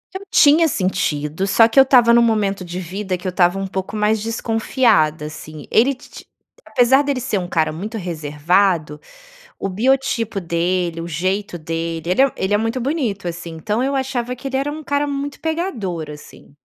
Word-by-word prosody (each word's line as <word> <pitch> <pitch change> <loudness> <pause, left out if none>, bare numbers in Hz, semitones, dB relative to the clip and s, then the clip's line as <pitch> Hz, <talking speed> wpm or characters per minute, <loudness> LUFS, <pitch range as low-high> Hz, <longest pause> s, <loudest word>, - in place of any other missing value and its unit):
Eu 380 - -4
tinha 310 +3 +6
sentido, 185 - -1
só 225 +3 +5
que 230 - -7
eu - - +10
estava 245 -3 +5
num 235 - +6
momento 210 -4 +1
de 175 0 -6
vida 185 +1 -4
que 180 - -7
eu - - +1
estava 180 +1 +2
um 195 - -3
pouco 190 +1 -5
mais 210 0 +1
desconfiada, 225 - +1
assim. 155 0 -9
Ele 250 +5 +4
titi 255 - -13 0.4
apesar 260 +2 +4
de 285 0 -1
ele 260 - -2
ser 225 -4 -1
um 180 - -5
cara 160 -3 0
muito 205 +9 -6
reservado, 160 -1 0 0.6
o 195 - -3
biotipo 230 -1 0
dele, 170 0 -1
o 165 - -5
jeito 185 +4 -2
dele, 165 +1 -4
ele 185 - +3
é 275 -1 +4
ele 190 +2 -1
é - - +5
muito 225 +4 -2
bonito, 235 - -2
assim, 170 0 -7
então 210 +8 -2
eu 275 +2 0
achava 255 -2 -2
que 265 - -7
ele 265 0 -1
era 275 +2 -1
um 310 +1 -7
cara 285 0 0
muito 280 0 -4
pegador, 240 - -3
assim. 150 -1 -13
200 Hz, 190 wpm, -19 LUFS, 170-255 Hz, 0.6 s, eu